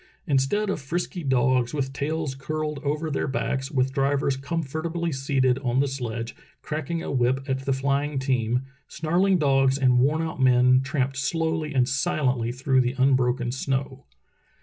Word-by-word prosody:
Instead 175 +8 +1
of 160 - -3
frisky 175 +4 -3
dogs 130 -1 +2
with 135 -2 -2
tails 150 +1 -2
curled 150 +2 -4
over 150 +2 -2
their 140 - -1
backs, 135 +1 -2
with 130 -3 0
drivers 140 0 +1
comfortably 165 +3 -3
seated 130 -2 +1
on 125 -1 0
the 140 - +2
sledge 120 -4 -4 0.3
cracking 160 +2 -3
a - - -4
whip 130 +1 0
at 130 -1 -1
the 140 - 0
flying 140 +2 0
team, 125 -2 0 0.2
snarling 180 +5 +1
dogs 135 -3 +3
and 130 -3 +3
worn 150 +5 +2
out 160 -4 -4
men 125 0 +5
tramped 135 -1 -1
slowly 160 +1 -1
and 125 -2 +3
silently 130 -4 0
through 130 +1 +2
the 125 +1 -1
unbroken 130 -2 +2
snow. 135 +1 -3
135 Hz, 155 wpm, -25 LUFS, 130-150 Hz, 0.3 s, men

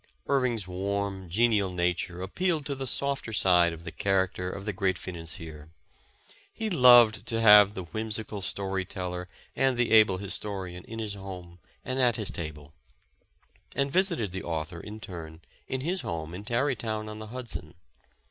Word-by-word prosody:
Irving 130 -4 +1
's 100 -5 -6
warm, 95 0 -3
genial 105 0 +2
nature 90 0 -1
appealed 165 - -1
to 140 - -2
the 135 -1 -5
softer 140 -3 -1
side 90 -5 +4
of 85 0 -9
the - - -6
character 95 -2 0
of 95 +1 -7
the 105 - -2
great 95 -1 0
financier. 80 -3 -7 0.8
He 220 -1 -4
loved 120 -7 +7
to 115 - 0
have 105 -2 +8
the 95 - -4
whimsical 110 +2 -3
story 95 0 -1
teller 90 -1 -5 0.3
and 135 -2 +2
the 120 -1 +1
able 105 -4 +6
historian 95 -2 -4
in 115 - -8
his 110 -2 -3
home 90 -3 -9 0.3
and 130 +1 -2
at 120 -3 +4
his 105 -4 0
table; 75 -2 -6 1.0
and 140 0 0
visited 175 - +1
the 95 +1 -4
author, 80 +1 -4
in 105 +5 -8
turn, 85 -5 -8 0.3
in 130 - -3
his 180 +6 -1
home 80 -1 -5
in 100 +3 -7
Tarry 130 +4 +1
town 110 -1 -3
on 110 0 -7
the 110 - -7
Hudson. 115 -10 -6
100 Hz, 165 wpm, -28 LUFS, 90-115 Hz, 1.0 s, have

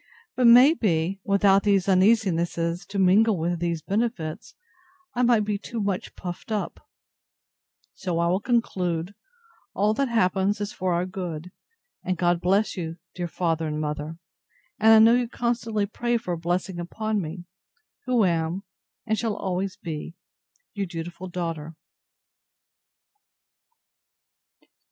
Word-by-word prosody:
But, 250 -2 +4
may 250 +6 +8
be, 190 - 0
without 200 0 +4
these 200 -2 +2
uneasinesses 180 -4 +2
to 200 - -5
mingle 195 +3 +4
with 170 +1 -1
these 170 -2 -2
benefits, 210 -3 -3 0.6
I 245 - -1
might 235 -4 +4
be 205 -1 -1
too 230 +3 -6
much 200 -3 -2
puffed 175 +4 -7
up: 210 -2 -2 1.1
So 175 -3 -3
I 170 - +2
will 180 +3 +2
conclude, 185 -7 -1 0.6
all 210 +2 +2
that 275 +3 0
happens 200 -2 +1
is 205 0 -4
for 185 0 -1
our 175 +1 0
good; 180 -2 -6 0.5
and 185 -1 -1
God 175 0 +1
bless 195 +4 +2
you, 165 -4 -4
my - - -18 0.2
dear 175 -1 -3
father 165 -2 -1
and 150 0 -3
mother; 150 +1 -4 0.6
and 220 +1 +6
I 220 - +9
know 225 +1 +7
you 245 0 +2
constantly 230 -3 -1
pray 240 +3 -1
for 200 -5 -5
a - - 0
blessing 175 +2 -2
upon 215 +4 -2
me; 175 +2 -7 0.6
who 245 -5 +3
am, 170 +2 -1 0.4
and 220 -1 0
shall 225 -3 -1
always 190 0 -3
be, 160 0 -6 0.6
Your 200 -2 -3
dutiful 175 +2 -6
DAUGHTER. 165 -3 -4
190 Hz, 140 wpm, -25 LUFS, 170-215 Hz, 1.1 s, I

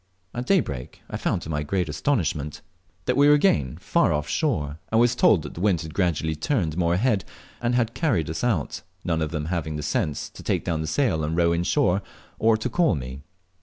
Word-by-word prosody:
At 120 +1 -4
daybreak 75 - -1
I - - -2
found, - - -1
to - - -8
my 75 -1 -1
great 90 +4 -1
astonishment, 75 - -1 0.4
that 125 - +1
we 140 +2 +5
were 145 - +7
again 75 - +2
far - - +2
off 75 0 -1
shore, 80 - -1
and 110 - +3
was 120 0 +4
told 105 -8 +4
that 75 - -7
the 85 - -7
wind 95 -6 +2
had 80 -1 -7
gradually 80 -4 0
turned 80 - -1
more 85 -1 +2
ahead, 105 -1 +1 0.4
and 120 0 +1
had 115 -2 +1
carried 120 - +1
us 80 +7 -4
out 105 -12 0 0.2
none 80 -2 0
of 80 - 0
them 75 -2 -3
having 80 -2 -2
the 75 - -4
sense 75 0 -1
to - - -11
take - - -1
down 80 -3 -1
the 80 - -3
sail 80 - +1
and 80 +2 -1
row 85 -1 +3
in 85 +1 0
shore, 100 -4 +2 0.4
or 110 0 +4
to 110 - -2
call 165 +5 +2
me. 65 0 -6
85 Hz, 220 wpm, -25 LUFS, 75-120 Hz, 0.4 s, were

